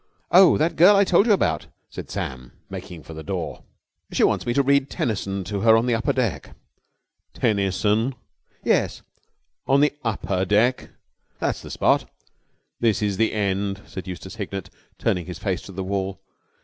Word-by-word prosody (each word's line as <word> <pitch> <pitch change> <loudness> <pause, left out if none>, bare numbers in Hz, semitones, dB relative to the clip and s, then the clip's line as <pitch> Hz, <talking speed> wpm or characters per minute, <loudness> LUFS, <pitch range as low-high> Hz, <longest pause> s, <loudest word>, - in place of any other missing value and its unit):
"Oh, 185 0 +7
that 160 +3 0
girl 185 +5 +7
I 200 - +5
told 195 +3 +3
you - - +4
about," 195 - 0 0.2
said - - -8
Sam 65 -2 -5 0.2
making 85 -3 -8
for 80 - -10
the 80 - -7
door. 75 - -4 0.5
"She - - +1
wants - - +2
me 120 - +1
to 140 - +4
read 140 0 +2
Tennyson 100 -4 -2
to 100 +2 -4
her 110 +1 +6
on 115 - +1
the 125 - +1
upper 115 +1 +1
deck." 105 - -2 0.8
"Tennyson?" 105 +3 +1 0.5
"Yes." - - +1 0.6
"On 135 +1 +4
the 145 0 +3
upper 100 -4 -1
deck?" 110 +6 +2 0.5
"That's - - -2
the - - -10
spot." - - +1 0.7
"This 110 -2 +1
is 100 -2 0
the 115 - +2
end," 100 -1 -1
said 95 -1 -8
Eustace 95 +3 -7
Hignett, 100 -3 -5 0.3
turning 90 -1 -1
his 90 -2 -6
face 95 -3 -2
to - - -11
the 95 0 -4
wall. 95 0 -3
105 Hz, 170 wpm, -23 LUFS, 95-125 Hz, 0.8 s, Oh